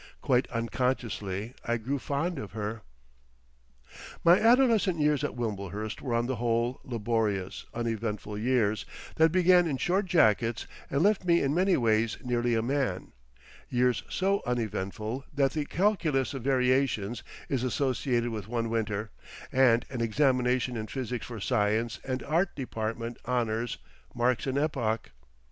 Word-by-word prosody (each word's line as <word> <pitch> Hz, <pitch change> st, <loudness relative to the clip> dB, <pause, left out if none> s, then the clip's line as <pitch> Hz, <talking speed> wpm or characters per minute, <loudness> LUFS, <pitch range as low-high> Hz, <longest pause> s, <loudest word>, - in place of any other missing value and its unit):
Quite 130 Hz, -2 st, +2 dB
unconsciously 115 Hz, -3 st, -2 dB
I 120 Hz, 0 st, 0 dB
grew 135 Hz, +5 st, -2 dB
fond 145 Hz, +5 st, -2 dB
of 105 Hz, -, -7 dB
her.... 110 Hz, +1 st, -4 dB, 1.4 s
My 170 Hz, +2 st, +7 dB
adolescent 230 Hz, -6 st, +4 dB
years 150 Hz, -2 st, +2 dB
at -, -, -2 dB
Wimblehurst 105 Hz, -2 st, -4 dB
were 125 Hz, -4 st, -2 dB
on 120 Hz, 0 st, +1 dB
the 130 Hz, 0 st, -2 dB
whole 120 Hz, +1 st, 0 dB
laborious, 110 Hz, -5 st, -2 dB
uneventful 110 Hz, -3 st, -3 dB
years 110 Hz, -3 st, +1 dB, 0.3 s
that 160 Hz, 0 st, +5 dB
began 180 Hz, 0 st, +5 dB
in 140 Hz, -4 st, -1 dB
short 190 Hz, +7 st, +1 dB
jackets 115 Hz, -, +3 dB, 0.2 s
and 140 Hz, +3 st, +1 dB
left 205 Hz, 0 st, +3 dB
me 170 Hz, -1 st, +4 dB
in 135 Hz, +1 st, +1 dB
many 185 Hz, +3 st, +3 dB
ways 115 Hz, -1 st, +2 dB
nearly 120 Hz, -1 st, +1 dB
a 110 Hz, -, +1 dB
man, 130 Hz, -7 st, -1 dB, 0.6 s
years 125 Hz, -2 st, +2 dB
so 195 Hz, +1 st, +1 dB
uneventful 110 Hz, +1 st, -3 dB
that 135 Hz, -2 st, +3 dB
the 150 Hz, -2 st, -1 dB
Calculus 165 Hz, -9 st, +1 dB
of 135 Hz, -, -5 dB
Variations 125 Hz, -4 st, +1 dB, 0.3 s
is 130 Hz, -3 st, -1 dB
associated 125 Hz, -2 st, 0 dB
with 105 Hz, -3 st, -5 dB
one 115 Hz, -1 st, -2 dB
winter, 110 Hz, -1 st, -2 dB, 0.4 s
and 125 Hz, -3 st, +4 dB
an 125 Hz, -3 st, -3 dB
examination 125 Hz, +1 st, +2 dB
in 110 Hz, -1 st, -4 dB
Physics 125 Hz, -2 st, -4 dB
for 115 Hz, -2 st, -7 dB
Science 110 Hz, +1 st, 0 dB
and 130 Hz, -1 st, -3 dB
Art 170 Hz, +5 st, 0 dB
department 115 Hz, -2 st, -4 dB
Honours 120 Hz, -2 st, -1 dB, 0.4 s
marks 120 Hz, +2 st, +1 dB
an 135 Hz, +1 st, 0 dB
epoch. 130 Hz, -7 st, -1 dB
120 Hz, 140 wpm, -29 LUFS, 110-140 Hz, 1.4 s, My